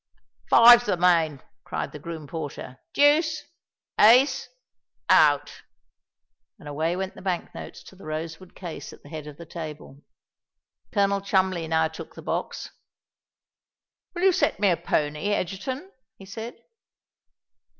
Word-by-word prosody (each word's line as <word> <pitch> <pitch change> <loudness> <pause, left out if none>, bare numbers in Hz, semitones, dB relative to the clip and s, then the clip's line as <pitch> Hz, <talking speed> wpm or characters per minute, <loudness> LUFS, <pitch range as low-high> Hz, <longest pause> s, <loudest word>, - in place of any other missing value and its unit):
"Five's 240 0 +8
the 195 - +1
main," 165 -5 +2 0.2
cried - - -4
the 150 - -9
groom 160 0 -7
porter: 140 -4 -7
"deuce, 310 +2 +3 0.6
ace—out." 265 - +2 1.0
And 170 -8 -13
away 160 +4 -1
went 190 +1 -4
the - - -13
bank 185 -3 -3
notes - - -9
to - - -15
the 190 - -14
rosewood 160 +3 -6
case 175 -4 -8
at - - -17
the 145 - -14
head 155 -1 -7
of 150 -1 -10
the 170 - -10
table. 155 -4 -9 0.9
Colonel 200 -2 +1
Cholmondeley 190 -4 0
now 160 0 +2
took 160 - -10
the - - -10
box. - - -4 1.4
"Will 350 - -3
you 385 - +6
set 370 - 0
me 200 -2 +3
a - - +3
pony, 150 +4 -1
Egerton?" 255 - -4 0.3
he 195 - -13
said. 220 +5 -7
180 Hz, 135 wpm, -25 LUFS, 160-210 Hz, 1.4 s, Five's